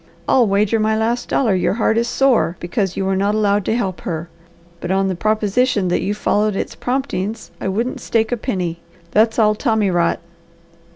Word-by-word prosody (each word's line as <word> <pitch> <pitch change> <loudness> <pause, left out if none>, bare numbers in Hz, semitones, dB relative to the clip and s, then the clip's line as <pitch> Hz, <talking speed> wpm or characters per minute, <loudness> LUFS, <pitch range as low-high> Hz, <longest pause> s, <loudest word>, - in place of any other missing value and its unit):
I'll 245 -4 +4
wager 205 +3 +2
my 220 0 +1
last 230 +2 -1
dollar 230 -7 +2
your 185 +1 +1
heart 220 -1 +1
is 235 +1 +1
sore 245 -10 +2
because 185 +2 -2
you 195 - -1
were 190 0 +1
not 200 +2 +1
allowed 205 -2 +1
to 220 - +1
help 195 -7 -2
her; 165 -1 -4 0.5
but 175 - -5
on 195 0 +1
the 185 - -2
proposition 215 +1 +1
that 175 - +1
you 205 +2 -1
followed 210 0 +1
its - - -3
promptings 235 -5 -3
I - - -2
wouldn't 230 +6 -2
stake 225 0 0
a 245 - 0
penny. 180 -8 -3 0.3
That's 220 +3 +3
all 215 -2 +4
tommy 215 -3 +1
rot!" 175 -1 +1
210 Hz, 190 wpm, -19 LUFS, 190-225 Hz, 0.5 s, I'll